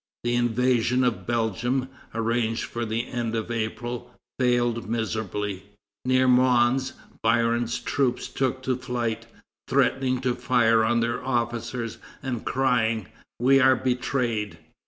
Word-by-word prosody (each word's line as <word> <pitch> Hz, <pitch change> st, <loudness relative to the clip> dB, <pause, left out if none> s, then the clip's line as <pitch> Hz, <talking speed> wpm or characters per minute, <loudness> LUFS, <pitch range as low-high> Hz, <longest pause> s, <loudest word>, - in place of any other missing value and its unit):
The 120 Hz, 0 st, 0 dB
invasion 120 Hz, +1 st, +2 dB
of 110 Hz, -7 st, -1 dB
Belgium, 120 Hz, +3 st, 0 dB, 0.3 s
arranged 115 Hz, 0 st, 0 dB
for 120 Hz, -1 st, -4 dB
the 115 Hz, +2 st, -1 dB
end 120 Hz, -2 st, -2 dB
of 115 Hz, +1 st, -3 dB
April, 120 Hz, +2 st, -4 dB, 0.3 s
failed 120 Hz, -3 st, +1 dB
miserably. 105 Hz, -3 st, -2 dB, 0.4 s
Near 130 Hz, 0 st, +3 dB
Mons, 125 Hz, +1 st, +3 dB, 0.3 s
Biron's 120 Hz, 0 st, +2 dB
troops 130 Hz, -3 st, -1 dB
took 130 Hz, -1 st, -2 dB
to 130 Hz, -1 st, +1 dB
flight, 120 Hz, -3 st, -3 dB, 0.4 s
threatening 130 Hz, -1 st, +2 dB
to 125 Hz, -2 st, +1 dB
fire 120 Hz, -2 st, +3 dB
on 115 Hz, +1 st, +2 dB
their 115 Hz, 0 st, -1 dB
officers, 120 Hz, -1 st, -2 dB, 0.2 s
and 125 Hz, -4 st, -3 dB
crying: 120 Hz, -6 st, +1 dB, 0.3 s
"We 135 Hz, +3 st, +5 dB
are 130 Hz, 0 st, +6 dB
betrayed!" 120 Hz, -7 st, -1 dB
120 Hz, 120 wpm, -25 LUFS, 115-125 Hz, 0.4 s, are